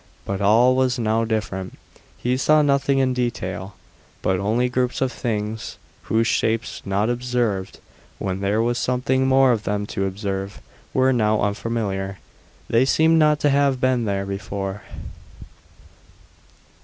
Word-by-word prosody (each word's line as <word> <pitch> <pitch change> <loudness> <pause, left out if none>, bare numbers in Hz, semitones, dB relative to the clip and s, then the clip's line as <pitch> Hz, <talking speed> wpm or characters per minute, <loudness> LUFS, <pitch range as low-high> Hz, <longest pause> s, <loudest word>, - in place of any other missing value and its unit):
But 100 0 -3
all 115 +5 +5
was 130 -1 +1
now 115 -1 +1
different; 105 -4 -3 0.4
he 125 +1 0
saw 150 +3 +4
nothing 140 -1 +2
in 130 -1 +2
detail, 95 -6 -3 0.5
but 95 -1 +1
only 110 +6 +1
groups 125 0 -1
of 130 -1 0
things, 110 -2 -4 0.3
whose 115 +1 +1
shapes, 115 0 0
not 100 +2 0
observed 120 -5 -1 0.4
when 95 -1 -3
there 100 +3 +1
was 120 +1 0
something 130 +1 +1
more 135 -1 +5
of 115 -3 0
them 105 0 -2
to 95 0 -1
observe, 95 0 -4 0.3
were 130 0 +3
now 110 -3 +2
unfamiliar. 100 -2 -2 0.5
They 115 +2 +3
seemed 160 +4 +3
not 150 -1 +4
to 145 - +3
have 140 -2 +2
been 130 -2 +1
there 100 -1 -1
before. 100 0 -4
115 Hz, 140 wpm, -22 LUFS, 100-130 Hz, 0.5 s, all